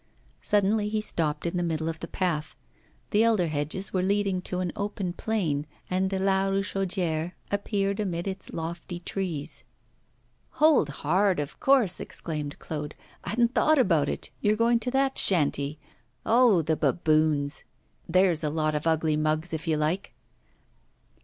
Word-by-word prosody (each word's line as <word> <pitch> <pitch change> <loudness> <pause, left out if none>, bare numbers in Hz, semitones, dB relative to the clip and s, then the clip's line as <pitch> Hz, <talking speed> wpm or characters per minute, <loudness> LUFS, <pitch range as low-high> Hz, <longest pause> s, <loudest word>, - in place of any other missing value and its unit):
Suddenly 210 +1 +2
he 215 0 0
stopped 160 -7 -1
in 170 +1 -1
the - - 0
middle 160 -2 -1
of 165 -1 -3
the 170 - -6
path. 155 -5 -2 0.6
The 215 -1 +4
elder 215 -7 +3
hedges 155 +6 -2
were 185 - +1
leading 195 -1 +1
to 180 0 -3
an 180 -2 -1
open 200 -3 -3
plain, 170 -9 -1 0.2
and 190 +1 +1
La 190 0 +2
Richaudière 185 -4 -1 0.2
appeared 200 0 -1
amid 180 -3 -2
its 190 0 -5
lofty 170 +1 -5
trees. 175 -5 -4 0.9
'Hold 300 - +4
hard! 180 +6 +1
of 145 -1 -5
course,' 255 -10 +3
exclaimed 150 -3 -5
Claude, 150 -1 -5 0.3
'I - - -3
hadn't 235 +2 +2
thought 310 0 +4
about 165 - +3
it - - -4
you're 210 +1 +3
going 230 +1 +3
to 250 - -1
that 270 +1 +1
shanty. 150 -4 +1 0.5
Oh! 230 -7 +5
the 160 +1 +1
baboons; 155 -3 +1 0.5
there's 180 -2 +3
a 150 - +1
lot 155 0 0
of 150 +2 -2
ugly 160 -1 +2
mugs, 155 +2 0
if 160 +1 -4
you 155 -1 +2
like! 160 +6 -1
180 Hz, 155 wpm, -27 LUFS, 155-200 Hz, 0.9 s, Oh